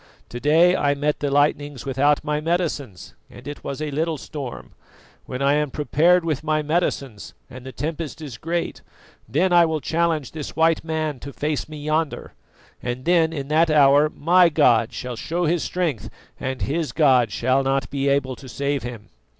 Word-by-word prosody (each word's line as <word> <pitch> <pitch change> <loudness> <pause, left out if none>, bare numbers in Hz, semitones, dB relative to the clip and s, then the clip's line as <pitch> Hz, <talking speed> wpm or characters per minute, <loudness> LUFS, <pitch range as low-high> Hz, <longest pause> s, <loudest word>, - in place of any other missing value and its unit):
"To 120 - -6
day 165 +6 +4
I 145 -4 +1
met 145 +1 -1
the 145 - -1
lightnings 145 -1 0
without 140 +2 +2
my 150 0 -1
medicines, 155 - -3 0.2
and - - -13
it 145 - -7
was 140 - -5
a 150 - -3
little 160 +2 -1
storm; 140 -3 -7 0.6
when 130 +1 -4
I 140 +1 +4
am 150 0 +1
prepared 165 +5 +2
with 155 -3 -2
my 155 -1 0
medicines 145 -8 -2 0.2
and 125 0 -10
the - - -6
tempest 160 +2 -5
is 140 -7 -8
great, 170 +1 -3 0.5
then 175 +9 +1
I 175 0 +7
will 160 -1 -1
challenge 160 -1 -1
this 155 -3 -7
white 165 0 +2
man 155 -3 -2
to 140 - -8
face 150 +1 -3
me 155 - -8
yonder, 155 +1 -2 0.5
and 125 +1 -4
then 170 -2 +3
in 140 -4 -5
that 160 +2 +3
hour 145 0 +5
my 175 +4 +4
god 120 -6 +3
shall 125 -1 -5
show 170 +9 -2
his 165 +1 +1
strength 165 - -2 0.3
and 130 0 -3
his 155 +2 -2
God 130 -8 +4
shall 130 +5 +1
not 135 0 0
be 140 0 -1
able 140 -2 0
to 135 - -12
save 140 +1 -2
him." 120 -3 -8
150 Hz, 185 wpm, -22 LUFS, 135-160 Hz, 0.6 s, I